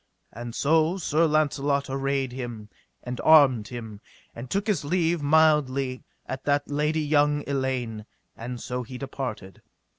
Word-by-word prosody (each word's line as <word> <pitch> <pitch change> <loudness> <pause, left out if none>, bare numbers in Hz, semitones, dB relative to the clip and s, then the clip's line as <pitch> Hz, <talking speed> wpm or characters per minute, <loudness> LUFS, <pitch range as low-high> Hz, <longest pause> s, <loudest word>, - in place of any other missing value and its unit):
And 120 +1 -7
so 160 +4 +2
Sir 165 -2 +2
Launcelot 145 -2 +1
arrayed 135 -1 -1
him, 120 -4 -7 0.3
and 125 0 -5
armed 135 -9 +6
him, 110 -4 -8 0.3
and 120 +2 -8
took 200 +1 -1
his 205 -9 0
leave 170 +1 0
mildly 140 -4 +2 0.2
at 130 0 -6
that 145 0 +1
lady 150 +2 0
young 145 0 +2
Elaine, 130 -6 -2 0.3
and 120 +1 -6
so 125 +1 -4
he 125 +1 -8
departed. 125 - -6
140 Hz, 140 wpm, -26 LUFS, 125-150 Hz, 0.3 s, armed